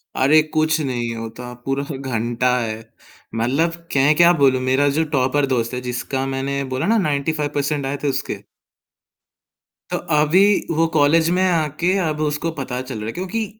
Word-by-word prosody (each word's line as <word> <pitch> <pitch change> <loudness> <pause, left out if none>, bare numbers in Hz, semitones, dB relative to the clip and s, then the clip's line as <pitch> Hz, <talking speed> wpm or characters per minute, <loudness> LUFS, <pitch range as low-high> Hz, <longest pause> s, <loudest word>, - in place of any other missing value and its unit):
अरे! 150 +4 +5
कुछ 155 0 +2
नहीं 120 -4 -2
होता 115 +2 -7
पूरा 135 +1 -1
ह 145 - -4
घंटा 120 -1 -1
है। 110 -2 -3 0.6
मतलब 135 +9 +1 0.2
क्यें 140 +2 +3
क्या 175 0 +7
बोलूँ, 135 -5 +3
मेरा 130 +2 +2
जो 160 - +3
टॉपर 140 0 +1
दोस्त 125 -3 -1
है, 125 - -3
जिसका 125 +2 -3
मैंने 135 +1 -2
बोला 130 - -1
न - - +2
95% 145 -2 -1
आए 140 +1 -2
थे, - - +1
उसके। 135 - -3 1.5
तो - - 0 0.2
अभी 150 +5 +4 0.4
वो 165 - +4
कॉलेज 160 +2 +4
में 185 - +2
आके 170 0 +1
अब 155 -1 -3
उसको 150 +2 -1
पता 125 -1 -3
चल 130 -3 -6
रहा 105 - -5
है, - - -2
क्योंकि 190 +5 -3
140 Hz, 170 wpm, -20 LUFS, 130-155 Hz, 1.5 s, क्या